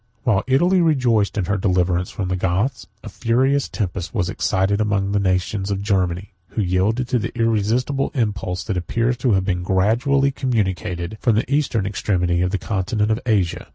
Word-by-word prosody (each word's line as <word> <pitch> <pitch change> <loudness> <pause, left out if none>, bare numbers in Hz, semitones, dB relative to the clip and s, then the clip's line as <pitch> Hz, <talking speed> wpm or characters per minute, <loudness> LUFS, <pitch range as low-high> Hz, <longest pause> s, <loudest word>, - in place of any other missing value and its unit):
While 110 -6 +2
Italy 175 +8 +3
rejoiced 125 -11 +2
in 95 - 0
her 100 +2 0
deliverance 90 -1 +1
from 95 -3 -4
the 95 - 0
Goths, 95 +9 -1 0.2
a - - -8
furious 130 +4 +1
tempest 90 -5 -4
was 90 - 0
excited 95 +3 0
among 100 -2 0
the 100 - +1
nations 95 +1 0
of 100 0 -2
Germany, 95 -1 -1
who 110 - -3
yielded 100 +7 0
to 125 - +2
the 115 - -3
irresistible 115 +5 +1
impulse 100 -6 -2
that 95 - -2
appears 115 +8 0
to 125 -3 +1
have 95 -1 +1
been 90 -2 -1
gradually 120 +10 +2
communicated 95 -6 -2
from 115 -4 +3
the 120 +5 0
eastern 130 -8 +1
extremity 90 -3 0
of 90 - +1
the 100 - -1
continent 105 +2 -1
of 110 - +1
Asia. 100 -7 0
100 Hz, 180 wpm, -21 LUFS, 95-120 Hz, 0.2 s, Italy